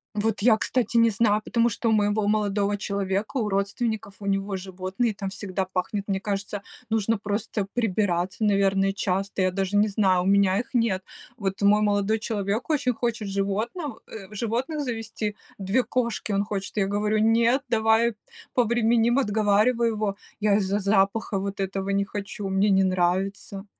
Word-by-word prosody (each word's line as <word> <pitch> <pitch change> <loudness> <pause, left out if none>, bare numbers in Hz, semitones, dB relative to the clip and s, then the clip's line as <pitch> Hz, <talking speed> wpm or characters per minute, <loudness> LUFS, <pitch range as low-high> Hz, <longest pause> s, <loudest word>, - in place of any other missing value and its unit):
Вот 215 0 0
я, 220 0 +5
кстати, 240 +1 0
не 230 0 +6
знаю, 215 0 +2
потому 235 0 +2
что 230 +1 -3
у - - +3
моего 205 0 +2
молодого 205 -1 +1
человека, 200 +3 -2
у 225 -4 0
родственников, 200 +1 -2
у 205 - -9
него 195 0 -1
животные, 190 +4 -2
там 195 -1 -4
всегда 190 -1 -3
пахнет. 185 +2 -2
Мне 195 -1 0
кажется, 200 0 -4 0.3
нужно 225 0 +1
просто 205 0 -2
прибираться, 195 -4 0
наверное, 195 -1 +3
часто, 195 0 -2
я 185 - +2
даже 195 +1 -1
не 210 +1 +4
знаю, 190 -3 +2
у - - -4
меня 195 0 +3
их 245 - -6
нет. 230 -6 +1 0.4
Вот 195 -3 -3
мой 205 +1 +5
молодой 205 +1 +1
человек 215 +1 -2
очень 270 -5 +1
хочет 225 -3 -2
животнов 215 - -2 0.3
животных 240 +8 -2
завести, 225 -4 -4 0.2
2 195 +6 +1
кошки 235 -4 -2
он 200 0 +2
хочет. 200 -1 -5
Я 200 -2 +1
говорю: 210 +2 0
"Нет, 230 +4 +3
давай 225 0 +3 0.4
повременим!" 235 0 +3
Отговариваю 220 0 +2
его. 210 -2 -1 0.3
Я 205 -1 +4
из-за 200 0 0
запаха 200 +1 +1
вот 200 0 -4
этого 195 0 -3
не 200 0 +2
хочу, 200 0 -5
мне 195 +2 +2
не 195 -1 +4
нравится. 190 +2 -1
205 Hz, 160 wpm, -25 LUFS, 195-225 Hz, 0.4 s, не